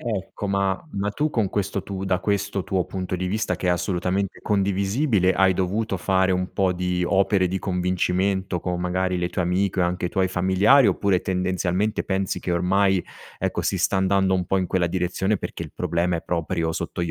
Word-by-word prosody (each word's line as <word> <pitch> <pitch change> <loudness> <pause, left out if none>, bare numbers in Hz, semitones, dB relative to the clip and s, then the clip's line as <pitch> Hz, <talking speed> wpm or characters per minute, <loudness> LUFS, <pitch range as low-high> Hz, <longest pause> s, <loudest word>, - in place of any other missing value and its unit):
Ecco 105 -3 -4
ma 100 -1 0
ma 100 +1 -1
tu 150 +9 0
con 110 -8 0
questo 100 -1 -2
tu 95 -1 -5
da 95 -1 0
questo 100 0 -1
tuo 95 -2 -1
punto 95 -1 -4
di 90 +1 -2
vista, 110 +4 -1
che - - -4
è 90 - +4
assolutamente 90 +2 -1
condivisibile, 100 +1 +1
hai 95 -1 +4
dovuto 95 +3 -1
fare 95 +1 +1
un 90 0 -1
po' 95 -2 +1
di 90 0 -1
opere 95 0 +2
di 95 +1 -2
convincimento 90 0 0
con, 90 0 -2
magari, 90 0 0
le 90 0 -1
tue 90 - -2
amiche 95 +2 0
o - - +4
anche 90 0 -1
i - - -2
tuoi 95 +1 +1
familiari, 95 +8 +4
oppure 95 -1 +2
tendenzialmente 95 +2 -1
pensi 95 -1 -1
che 90 - -3
ormai, 95 +1 +2 0.3
ecco, - - -1
si - - 0
sta - - +1
andando 95 0 +2
un 90 - 0
po' 95 - +1
in 90 - -1
quella 90 -2 +1
direzione 95 +3 0
perché - - -6
il - - -12
problema 85 0 0
è 85 - -3
proprio 85 -1 -1
sotto 85 - -3
gli 85 - -2
95 Hz, 200 wpm, -23 LUFS, 90-100 Hz, 0.3 s, è